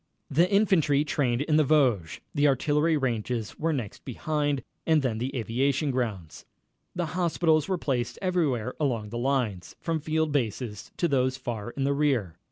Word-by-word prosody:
The 170 +6 +4
infantry 185 -9 +3
trained 135 -3 0
in 155 0 +2
the 155 - +5
Vosges. 130 - +2
The 145 +1 +3
artillery 150 +4 +2
ranges 120 -4 -2
were 165 +1 +1
next 125 -10 -4
behind, 145 +1 -1 0.2
and 160 -3 +4
then 115 -4 -1
the 130 +3 -3
aviation 135 +5 0
grounds. 105 -11 -3 0.5
The 175 -1 -1
hospitals 165 -3 +2
were 190 -1 0
placed 130 -7 -2
everywhere 150 - 0
along 120 -8 -1
the 120 +2 -4
lines, 120 -9 -1
from 165 -1 -1
field 155 0 0
bases 115 -5 -2
to 170 - +2
those 130 -3 +1
far 120 -4 -5
in 135 +3 -3
the 140 +1 +2
rear. 135 - +1
135 Hz, 165 wpm, -27 LUFS, 120-155 Hz, 0.5 s, the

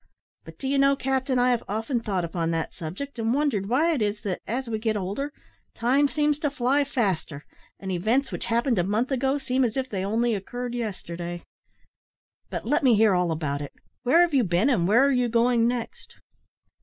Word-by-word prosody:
But - - -12
do 270 - -5
you 275 +1 +1
know, 275 0 +4
captain, 265 -1 -1
I 250 0 +3
have 240 - +1
often 225 +5 -1
thought 195 -6 -2
upon 165 0 -2
that 165 -1 -2
subject, 195 - -7
and 225 +2 +1
wondered 250 -10 0
why 310 +8 +3
it 275 - -1
is 210 0 -1
that, 190 -3 -3
as 250 +4 -2
we 220 -1 -2
get 215 -1 0
older, 205 +10 -3 0.4
time 265 +5 +3
seems 295 0 0
to 295 - 0
fly 275 +1 +1
faster, 195 - -2 0.3
and 190 -1 -5
events 220 +10 0
which - - -4
happened 235 -1 +1
a - - +2
month 215 +8 0
ago 270 +1 +1
seem 265 -1 0
as 235 0 -1
if 260 -1 -1
they 190 -2 -2
only 230 +4 +1
occurred 245 +5 -4
yesterday. 175 -7 -5 1.1
But - - -5
let 295 +8 +2
me 255 -5 +5
hear 215 -1 +4
all 180 -2 +1
about 150 -3 -2
it. 145 - -7 0.3
Where 270 +8 +4
have 345 -3 +2
you 265 -3 +4
been, 185 +8 +2
and 180 -9 +2
where 235 +7 +5
are 280 - +3
you 250 -2 +1
going 235 0 +3
next?" 240 -1 -5
235 Hz, 205 wpm, -25 LUFS, 195-265 Hz, 1.1 s, me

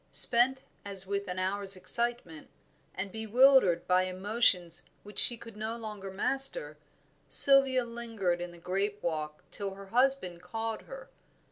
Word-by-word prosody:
Spent 255 +2 +3 0.2
as 195 -2 -4
with 200 +1 -4
an 180 0 -6
hour's 195 +1 +1
excitement, 210 -5 -2 0.5
and 190 +1 -6
bewildered 220 -4 +2
by 185 0 +1
emotions 185 -2 -1 0.2
which 205 0 -1
she 240 - +7
could 230 -2 -14
no 220 +2 -5
longer 210 -4 -9
master, 195 - -1 0.5
Sylvia 270 -2 +7
lingered 225 -7 -4
in 175 - -6
the 175 - -15
grape 195 +4 -4
walk 155 -2 -5
till 195 -2 -5
her 195 0 -12
husband 245 -9 0
called 225 +5 -6
her. - - -12
200 Hz, 140 wpm, -28 LUFS, 185-235 Hz, 0.5 s, she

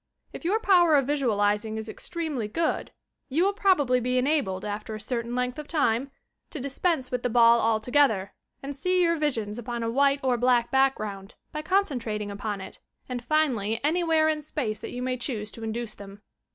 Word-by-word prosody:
If - - -8
your 395 +6 +1
power 355 -7 +5
of 275 -2 +3
visualiz 210 -7 +1
ing 220 0 -5
is 220 0 -5
extremely 295 -1 -4
good 315 +9 -1 0.4
you 310 +6 +2
will 400 +1 +2
probably 295 -11 +3
be 250 +1 0
enabled, 250 -9 0
after 210 +1 -4
a - - -6
certain 235 +2 -3
length 250 +2 -2
of 300 - -7
time, 275 -5 +1 0.4
fo - - -6
dispense 275 +1 -1
with 250 -1 -1
the 245 - -1
ball 235 0 +6
altogether, 225 -2 +2 0.3
and 280 +1 -5
see 365 +5 +2
your 335 -1 +3
visions 240 -9 -1
upon 240 0 -4
a 230 - -1
white 280 +2 +3
or 255 -2 +2
black 240 -1 +2
background, 215 -7 0 0.2
by 305 - -4
concentrating 245 - -1
upon 205 0 -4
it, - - -10 0.3
and 245 -2 -6
6nally 240 -9 +1
anywhere 320 0 +2
in 310 -1 0
space 245 -8 -3
that - - -7
you 250 0 -5
may 255 0 -1
choose 225 -4 -4
to 230 - -9
induce 225 0 -4
them. 200 +1 -12
250 Hz, 190 wpm, -26 LUFS, 220-300 Hz, 0.4 s, ball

